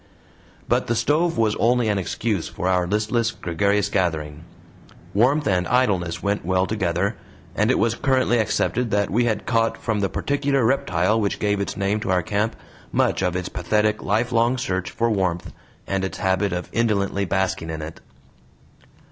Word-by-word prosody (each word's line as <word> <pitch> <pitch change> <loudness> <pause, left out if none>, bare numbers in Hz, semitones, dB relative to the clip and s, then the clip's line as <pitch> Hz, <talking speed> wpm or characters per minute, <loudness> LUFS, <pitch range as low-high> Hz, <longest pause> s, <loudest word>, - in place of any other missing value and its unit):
But - - +1
the 120 - +1
stove 165 +7 +1
was 110 -2 +2
only 120 0 +2
an 105 -2 +1
excuse 100 0 -2
for 90 - -4
our 90 -1 +2
listless, 110 +4 +1
gregarious 100 -1 0
gathering; 80 -4 -2 0.7
warmth 135 +8 +3
and 90 -3 +1
idleness 95 -9 +1
went 100 +1 0
well 95 +2 +1
together, 100 0 -1 0.4
and - - +2
it - - +3
was 115 0 +2
currently 130 -1 +2
accepted 120 +2 0
that 100 -1 0
we 120 +4 +2
had 110 -2 -1
caught 115 -1 +1
from 110 -2 -2
the 100 -1 0
particular 140 -3 0
reptile 110 -4 +1
which 100 - -1
gave 105 -1 0
its 100 - -4
name 100 +2 0
to 105 - -4
our 90 -2 +2
camp 105 +3 -1 0.4
much - - +1
of 90 -2 0
its 90 0 -2
pathetic, 105 +4 0
lifelong 115 +3 +1
search 95 -8 -2
for 115 0 0
warmth, 90 -3 -1 0.3
and 95 -1 -1
its 95 - -3
habit 95 +1 +1
of 90 0 -3
indolently 100 -4 +1
basking 95 -3 -1
in 80 -1 -4
it. 80 +1 -9
105 Hz, 170 wpm, -23 LUFS, 90-115 Hz, 0.7 s, warmth